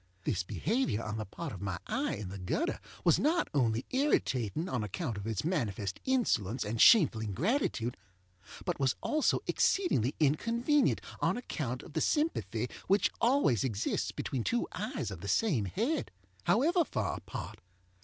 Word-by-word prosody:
This 95 0 0
behavior 115 - -1
on 110 0 -4
the 110 - -3
part 160 - -6
of 95 - -8
my 100 -3 -2
eye - - -1
in 100 -2 -6
the 100 +1 -7
gutter 295 - -1 0.2
was - - +4
not 335 +4 +2
only 120 -4 +1
irritating 160 - +1
on 125 -10 -1
account 115 - -3
of 100 +1 -6
its 110 -3 -2
manifest 105 - -2
insolence 135 - +1
and 110 +2 -1
shameful 160 - +7
ingratitude, 125 - 0 0.7
but 175 -4 -2
was 135 -2 +2
also 305 -1 +1
exceedingly 145 - +2
inconvenient 235 - +2 0.2
on - - +1
account 130 - -4
of 160 - -12
the 160 - 0
sympathy 120 - 0 0.2
which 200 +2 +3
always 235 - +3
exists 110 -6 -1
between 130 -4 -3
two 240 - 0
eyes - - -3
of - - -7
the - - -6
same 155 - +2
head, 235 - -1 0.4
however 330 - +4
far 110 - -2
apart. - - -7
135 Hz, 155 wpm, -31 LUFS, -, 0.7 s, shameful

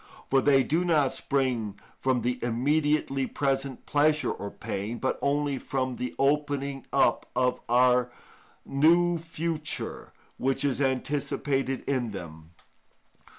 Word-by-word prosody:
For 135 0 +5
they 135 -1 +4
do 160 +6 +1
not 155 -6 +2
spring 120 -7 -1 0.2
from 130 -2 +1
the 125 0 -1
immediately 135 +2 +1
present 135 -1 -2
pleasure 150 +1 +2
or 100 - -5
pain, 100 +4 -4
but 130 - -1
only 140 -1 0
from 130 -2 -2
the 125 -1 -4
opening 140 -1 0
up - - +2
of 125 -1 +1
a 125 0 +4 0.6
new 170 +4 +3
future 165 -1 -4 0.3
which 135 +2 0
is 140 -1 0
anticipated 135 0 -1
in 125 -6 -1
them. 80 -4 -9
135 Hz, 120 wpm, -27 LUFS, 125-145 Hz, 0.6 s, For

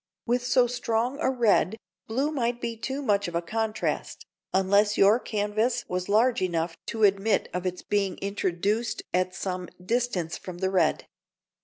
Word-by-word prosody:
With 245 +1 +1
so 250 0 +4
strong 245 +2 -1
a 290 - +2
red, 225 -4 +2 0.3
blue 270 +7 0
might 240 -4 -1
be 235 -1 -3
too 265 +5 -4
much 205 -5 +2
of 170 - -6
a 170 - +1
contrast, 220 +4 -2 0.3
unless 200 +2 +3
your 205 +4 +6
canvas 215 +3 -1
was 180 +1 -3
large 225 +3 +3
enough 170 -2 -1
to 225 -2 -2
admit 200 +2 +3
of 180 +1 -2
its 180 0 -4
being 195 -3 0
introduced 200 +3 -1
at 185 +1 +1
some 185 -2 -4 0.2
distance 225 -7 -1
from 180 -2 -8
the 190 +1 -1
red. 175 -5 +2
210 Hz, 160 wpm, -27 LUFS, 185-235 Hz, 0.3 s, your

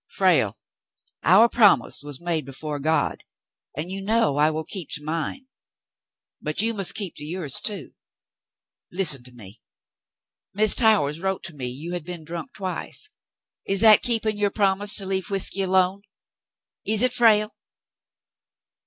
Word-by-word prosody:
Frale, 150 - +1 0.6
our 195 +8 +5
promise 205 - +3
was 145 -2 -7
made 170 -3 -2
before 145 +3 -6
God, 160 +3 -1 0.5
and 165 +4 -4
you 195 +1 -3
know 220 -6 0
I 150 +1 +3
will 155 0 -4
keep 180 -1 -7
to 150 - -4
mine. 165 - -4 1.0
But 150 0 -3
you 225 +2 +3
must 195 -4 +1
keep 195 -5 -4
to - - -8
yours, 155 -3 -2
too. 205 -2 0 1.0
Listen 170 -8 0
at 125 - -17
me. 105 -2 -13 1.0
Mrs. 215 0 +6
Towers 200 - +3
wrote 190 -1 -3
me 135 -5 -6
you 150 +8 -6
had 175 -3 -4
been 175 -1 -7
drunk 170 - -8
twice. 195 - -2 0.6
Is 195 0 +2
that 220 -2 +7
keeping 220 -3 0
your 205 -1 +1
promise 200 0 +1
to 195 - 0
leave 190 0 -2
whiskey 195 0 0
alone? 190 +1 +1 0.8
Is 220 +2 +4
it, 255 -1 +2
Frale 215 -3 +3
185 Hz, 145 wpm, -23 LUFS, 155-205 Hz, 1.0 s, that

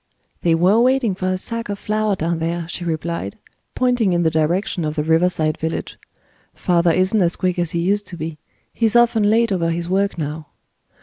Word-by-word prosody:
"They 165 -1 +3
were 185 +7 +4
waiting 255 -4 +2
for 185 0 -3
a 185 0 0
sack 230 +3 -5
of 205 - -3
flour 215 0 0
down 165 -1 -2
there," 165 +1 -2
she 175 +1 -6
replied, 165 - -3 0.4
pointing 245 -6 +2
in 175 0 +1
the 160 - +2
direction 170 +4 0
of 155 0 -2
the 150 - 0
river 165 +3 +3
side 155 -3 -1
village. 160 +1 -4 0.6
"Father 175 -1 +2
isn't 185 +5 +2
as 175 -1 +2
quick 180 -1 -1
as 175 -2 0
he 170 - -2
used 200 +3 0
to 175 - -6
be. 155 -1 -6 0.3
He's 225 -1 0
often 230 -3 +4
late 230 +1 +3
over 170 -3 0
his 170 +1 -2
work 195 +2 0
now." 155 0 -4
175 Hz, 200 wpm, -20 LUFS, 165-205 Hz, 0.6 s, were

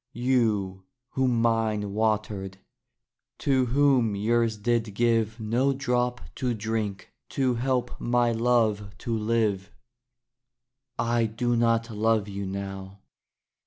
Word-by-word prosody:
You, 110 -7 0 0.2
whom 130 -3 +1
mine 110 -3 0
watered; 105 -3 -1 0.8
to 130 -3 +1
whom 130 -4 +3
yours 115 +2 +1
did 115 -1 -1
give 115 -1 +1
No 120 +6 +1
drop 125 -2 -1 0.2
to 125 -3 -1
drink 110 -2 -3 0.2
to 130 -2 +1
help 125 +1 -2
my 120 0 +2
love 110 -4 +1
to 115 0 -3
live 105 -3 0 1.3
I 115 -1 +1
do 120 +2 -1
not 115 0 +1
love 110 -1 +1
you 100 -1 -5
now. 95 0 -6
115 Hz, 110 wpm, -26 LUFS, 105-120 Hz, 1.3 s, whom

